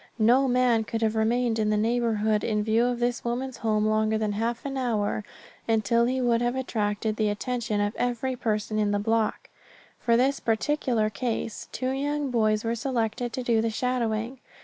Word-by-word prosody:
No 245 +4 +4
man 245 -3 +3
could 225 +1 -3
have 220 0 +1
remained 230 +1 +1
in 215 -1 +1
the 210 - +2
neighborhood 220 -1 +1
in 210 -2 0
view 225 +2 +2
of 245 0 0
this 240 0 -1
woman's 250 +2 -3
home 215 -1 +1
longer 215 0 +2
than 215 -1 -1
half 230 +4 -2
an 275 -1 -3
hour 220 -5 -1 0.4
until 225 +1 +2
he 260 +1 0
would 240 -2 +2
have 240 +1 0
attracted 215 -4 -1
the 215 -1 +1
attention 225 0 -2
of 205 +1 0
every 245 +1 -1
person 215 -2 -1
in 210 -1 +2
the 205 - +1
block. 220 +1 -1 0.5
For 235 -1 +2
this 270 +3 +2
particular 230 -1 0
case 225 0 -3
two 255 0 -2
young 285 +1 -1
boys 215 -2 +2
were 230 0 0
selected 235 -1 -2
to 255 - -3
do 230 -2 +2
the 230 - 0
shadowing. 235 +1 -1
230 Hz, 185 wpm, -26 LUFS, 215-245 Hz, 0.5 s, No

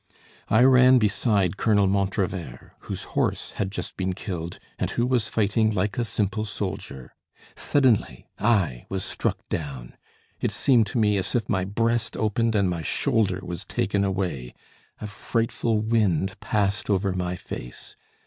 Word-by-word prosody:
I 110 +3 +5
ran 130 0 +7
beside 105 -4 +2
Colonel 105 -2 +3
Montrevert, 95 -2 -2
whose - - -6
horse - - 0
had 100 - -2
just - - -5
been 95 -1 -1
killed, 90 -3 -5 0.2
and - - 0
who 120 - 0
was 125 -3 +1
fighting 110 +1 +2
like 105 +3 -1
a 120 - +1
simple 105 0 -1
soldier. 95 - -5 0.4
Suddenly 125 - +1
I 100 - +1
was 95 -1 -2
struck - - -1
down; 70 -6 -5 0.4
it - - 0
seemed 120 -6 +3
to 110 - -3
me 105 -2 +3
as 95 +4 -1
if 120 - 0
my 95 -3 0
breast 115 +3 0
opened 110 +1 +1
and 100 -2 +3
my 85 -2 -2
shoulder 95 +5 +1
was 85 -2 -5
taken 100 0 0
away. 90 -11 -2 0.4
A - - -6
frightful 115 +1 -1
wind 100 -4 +1
passed 100 -1 0
over 100 -1 +1
my 90 -1 -2
face. - - -8
100 Hz, 150 wpm, -25 LUFS, 95-110 Hz, 0.4 s, ran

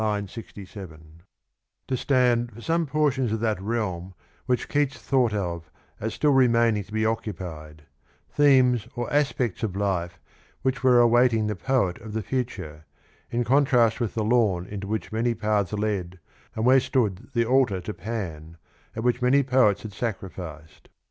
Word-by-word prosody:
67) 95 -7 -11 0.7
to 130 - 0
Stand 125 -2 +2
for 115 +2 -12
some 165 +3 0
portions 140 -5 +1
of 110 - -1
that 110 -4 0
realm 95 -4 -3 0.3
which 125 -2 0
Keats 145 -2 0
thought 130 -4 +1
of 85 -6 -3 0.3
as 110 +1 -3
still 150 - +2
remaining 115 -5 +3
to 100 - -19
be 110 0 0
occupied; 85 -9 -4 0.4
themes 130 -5 +3
or 120 +1 -4
aspects 135 - 0
of 105 -5 -2
life 90 -4 -2 0.4
which 130 0 -1
were 125 -2 +6
awaiting 120 -1 +4
the 105 0 -2
poet 120 -5 0
of 110 -1 -9
the 110 -1 -2
future, 90 - -4 0.4
in 120 +1 0
contrast 125 -3 +3
with 115 -4 -2
the 110 - 0
lawn 105 -6 +2
into 100 0 -6
which 110 +1 -3
many 115 +2 0
paths 105 -4 0
led 100 -4 -2 0.4
and 110 - -1
where 130 +1 +6
stood 110 -8 -1
the 120 -1 +2
altar 125 -6 +2
to 95 +4 -6
Pan, 85 -9 -6 0.4
at 110 - -4
which 125 0 +1
many 135 +3 +4
poets 125 -6 +3
had 110 -2 -7
sacrificed. 90 -8 -6
110 Hz, 155 wpm, -25 LUFS, 95-125 Hz, 0.7 s, were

